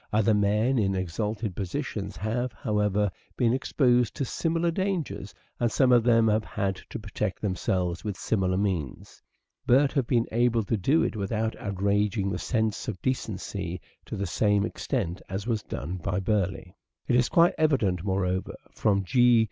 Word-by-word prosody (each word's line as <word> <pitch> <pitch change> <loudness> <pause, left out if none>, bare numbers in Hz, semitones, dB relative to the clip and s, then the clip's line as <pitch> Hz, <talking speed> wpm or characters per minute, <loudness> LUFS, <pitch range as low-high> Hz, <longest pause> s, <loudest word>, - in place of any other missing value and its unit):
Other 110 +1 +3
men 105 +5 +2
in 95 -2 +1
exalted 100 +3 -3
positions 100 -1 -4
have, 115 +4 -2
however, 105 -2 0 0.3
been 120 -1 +3
exposed 125 -3 +2
to 140 - -1
similar 165 +5 0
dangers 190 -2 -3 0.2
and 120 -2 +1
some 130 +1 +3
of 120 -2 +6
them 115 -1 +4
have 110 0 +2
had 100 -3 -2
to - - -5
protect 105 -2 -3
them 100 -3 -1
selves 90 -2 -1
by 105 - -3
similar 95 0 0
means, 90 -10 -3 0.5
but 135 +3 +5
have 135 -5 0
been 120 -2 +2
able 120 0 +2
to 105 - 0
do 135 - +2
it - - -1
without 110 +2 -1
outraging 100 0 0
the 90 - -3
sense 110 -3 -1
of 105 -5 -4
decency 100 -7 -3 0.3
to - - -5
the 100 - -2
same 100 +2 +2
extent 100 - -3
as 95 +2 -4
was 115 -3 0
done 85 +2 -5
by 90 +2 -2
Burleigh. 95 -2 -1 0.3
It 120 - +2
is 125 0 +3
quite 170 +1 +5
evident, 110 - +2
moreover, 95 -1 -1 0.2
from 100 -2 +1
G. 120 +3 +5
105 Hz, 165 wpm, -27 LUFS, 95-120 Hz, 0.5 s, of